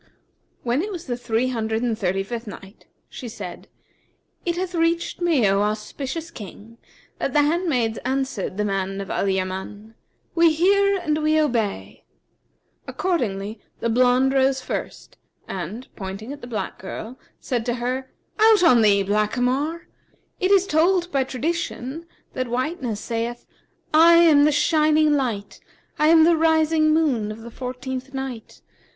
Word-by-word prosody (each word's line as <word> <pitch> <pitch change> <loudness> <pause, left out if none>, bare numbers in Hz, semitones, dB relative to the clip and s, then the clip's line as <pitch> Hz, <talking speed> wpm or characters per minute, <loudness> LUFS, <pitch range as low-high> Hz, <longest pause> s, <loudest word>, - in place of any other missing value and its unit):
When 245 +4 +1
it 415 +4 -4
was 350 -3 -6
the 245 - -2
Three 240 +1 -1
Hundred 225 -1 -2
and 235 -2 0
Thirty 195 -2 -1
fifth 230 +2 -6
Night, 195 0 -11 0.2
She 245 - -8
said, 185 -5 -8 0.8
It 345 0 0
hath 365 0 -3
reached 335 +1 0
me, 315 -11 +3
O 195 +1 +2
auspicious 265 +10 -3
King, 225 - -11 0.4
that 275 - -2
the 295 - +4
handmaids 290 -8 0
answered 260 -7 -2
the 210 - 0
man 195 -1 -2
of 195 - -5
Al 200 - 0
Yaman, 190 +3 -4 0.4
"'We 335 -1 +4
hear 395 +4 +3
and 310 -4 -1
we 310 +1 +3
obey!' 235 -9 -1 0.8
Accordingly 215 - -2 0.2
the 230 - -1
blonde 255 +2 +3
rose 265 0 +2
first 255 - -6 0.3
and, 195 +7 -6
pointing 200 +6 -6
at 290 - -11
the 245 - -8
black 210 -6 -4
girl, 220 +6 -7 0.2
said 245 -3 -2
to 240 - 0
her: 255 +2 -3 0.3
'Out 435 -3 +6
on 250 -9 +6
thee, 200 -2 +4
blackamoor! 250 - 0 0.5
It 370 - +1
is 390 -1 +5
told 350 +1 +2
by 270 -2 +1
tradition 305 +1 -4 0.3
that 255 -1 -2
whiteness 250 -2 -2
saith, 235 +2 -4 0.5
'I 330 +2 +7
am 325 -4 +6
the 300 - +4
shining 305 0 +3
light, 235 -8 -2 0.4
I 305 - +4
am 320 0 +7
the 335 +1 +5
rising 315 -1 +3
moon 270 -10 +1
of 215 +1 -9
the 235 +1 -10
fourteenth 260 +2 -6
night. 265 -4 -6
255 Hz, 150 wpm, -23 LUFS, 220-315 Hz, 0.8 s, I